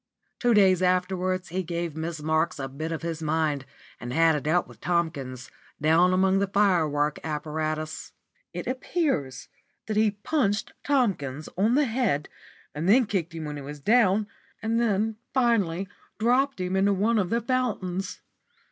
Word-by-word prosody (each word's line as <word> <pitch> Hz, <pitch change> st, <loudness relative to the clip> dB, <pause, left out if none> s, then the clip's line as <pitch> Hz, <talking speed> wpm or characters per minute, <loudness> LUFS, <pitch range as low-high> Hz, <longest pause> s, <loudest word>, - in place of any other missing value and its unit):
Two 240 Hz, -2 st, +3 dB
days 190 Hz, -3 st, +5 dB
afterwards 185 Hz, 0 st, 0 dB
he 185 Hz, +3 st, -1 dB
gave 170 Hz, -2 st, -4 dB
Miss 160 Hz, -1 st, -4 dB
Marks 160 Hz, +2 st, +1 dB
a 135 Hz, -1 st, -4 dB
bit 155 Hz, +5 st, -5 dB
of 165 Hz, 0 st, -4 dB
his 165 Hz, -1 st, -3 dB
mind, 155 Hz, -3 st, 0 dB, 0.3 s
and 120 Hz, -, -6 dB
had 165 Hz, +4 st, +4 dB
it 150 Hz, 0 st, -3 dB
out 175 Hz, +3 st, +2 dB
with -, -, -16 dB
Tomkins, 145 Hz, -7 st, -2 dB, 0.3 s
down 165 Hz, +4 st, +4 dB
among 190 Hz, +1 st, +3 dB
the 200 Hz, -, +1 dB
firework 165 Hz, -7 st, +2 dB
apparatus. 155 Hz, 0 st, -3 dB, 0.4 s
It -, -, -5 dB
appears 255 Hz, -, -2 dB, 0.4 s
that 215 Hz, -1 st, -2 dB
he 215 Hz, 0 st, +4 dB
punched 205 Hz, 0 st, -1 dB
Tomkins 175 Hz, -, 0 dB
on 215 Hz, +7 st, +2 dB
the 295 Hz, +1 st, +4 dB
head, 220 Hz, -, 0 dB, 0.4 s
and 160 Hz, +5 st, -2 dB
then 245 Hz, +4 st, +6 dB
kicked 175 Hz, -5 st, -2 dB
him 160 Hz, -1 st, -5 dB
when 150 Hz, 0 st, -5 dB
he -, -, -6 dB
was 145 Hz, +2 st, -8 dB
down, 210 Hz, -, +3 dB, 0.3 s
and 220 Hz, -1 st, 0 dB, 0.2 s
finally 200 Hz, -8 st, +2 dB, 0.3 s
dropped 250 Hz, +3 st, +2 dB
him 185 Hz, +1 st, -1 dB
into 200 Hz, +1 st, +3 dB
one 215 Hz, +4 st, +2 dB
of 185 Hz, -3 st, 0 dB
the 230 Hz, -, +1 dB
fountains. 215 Hz, -7 st, -2 dB
180 Hz, 155 wpm, -26 LUFS, 155-215 Hz, 0.4 s, then